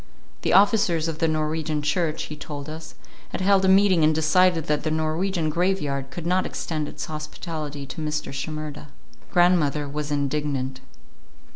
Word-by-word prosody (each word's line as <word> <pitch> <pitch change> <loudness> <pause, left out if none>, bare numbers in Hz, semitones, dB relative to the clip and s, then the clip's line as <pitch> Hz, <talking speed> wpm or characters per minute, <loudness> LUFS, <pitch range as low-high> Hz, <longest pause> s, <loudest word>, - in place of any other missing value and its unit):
The - - +1
officers 195 -5 +4
of 160 -1 -4
the 165 - +2
Norwegian 155 -1 -1
church, 155 +1 0
he 150 - -6
told 145 -1 -7
us, 160 +1 -8 0.3
had - - -4
held 195 0 +4
a - - +3
meeting 190 -3 +5
and 155 0 +4
decided 165 +1 +3
that 150 -1 0
the 155 - -1
Norwegian 160 +2 0
graveyard 150 -6 0
could 170 +5 -7
not 185 +2 +2
extend 155 -3 -3
its - - -6
hospitality 155 -1 -6
to 155 - -7
Mr. 150 -2 -3
Shimerda. 150 +1 -5 0.4
Grandmother 165 -5 +3
was 150 +1 -4
indignant. 140 -2 -1
155 Hz, 155 wpm, -24 LUFS, 150-175 Hz, 0.4 s, meeting